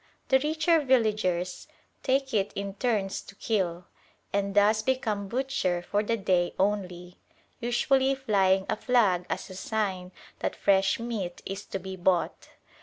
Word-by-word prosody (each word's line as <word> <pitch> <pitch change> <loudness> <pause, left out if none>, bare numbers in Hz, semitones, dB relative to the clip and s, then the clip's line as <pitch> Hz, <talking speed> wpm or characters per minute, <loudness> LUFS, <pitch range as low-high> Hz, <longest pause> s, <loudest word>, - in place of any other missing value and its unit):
The 265 - +5
richer 315 +3 +2
villagers 210 -9 +1 0.3
take 270 0 0
it 200 -2 +1
in 200 0 -4
turns 205 -3 -1
to 195 - -14
kill, 180 -6 -1 0.5
and 200 0 -1
thus 210 +1 +4
become 215 -5 -1
butcher 215 -8 -1
for 205 - +1
the 230 +2 -1
day 185 -4 +1
only, 180 -3 -2 0.4
usually 265 +3 +2
flying 195 -7 +2
a - - 0
flag 200 -9 +2
as - - -4
a - - -8
sign 190 -3 -2 0.3
that - - -2
fresh 195 +1 +2
meat 220 -7 -4
is 195 +1 -5
to - - -4
be 190 0 -7
bought. 180 -1 0
200 Hz, 145 wpm, -28 LUFS, 190-240 Hz, 0.5 s, The